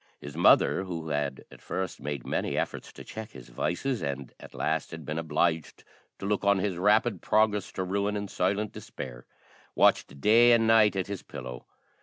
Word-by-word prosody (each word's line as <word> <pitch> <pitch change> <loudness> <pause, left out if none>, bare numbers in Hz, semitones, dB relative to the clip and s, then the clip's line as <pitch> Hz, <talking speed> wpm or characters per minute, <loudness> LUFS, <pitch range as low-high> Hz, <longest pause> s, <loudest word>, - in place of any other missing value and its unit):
His 75 0 -9
mother, 85 +3 +4
who 85 -3 -5
had 70 -3 -2
at - - -14
first 95 -1 -4
made 70 -3 -4
many - - -1
efforts - - -3
to - - -10
check 110 -1 -8
his 65 -3 -12
vices, 115 - -2
and 70 -2 -4
at - - -13
last - - -1
had 80 -2 -9
been 75 +2 -3
obliged 80 0 -1 0.3
to - - -7
look 100 0 0
on 100 0 +4
at 95 - 0
his 95 -4 -2
rapid 105 +1 +3
progress 105 -2 +2
to 95 - -2
ruin 100 +2 -1
in 100 0 -4
silent 100 +3 -1
despair, - - -9 0.5
watched 70 - +3
day 115 +6 +6
and 115 -1 +4
night 110 -2 +5
at 95 -2 -1
his 100 -1 -5
pillow. 60 -1 -8
95 Hz, 190 wpm, -28 LUFS, 75-105 Hz, 0.5 s, day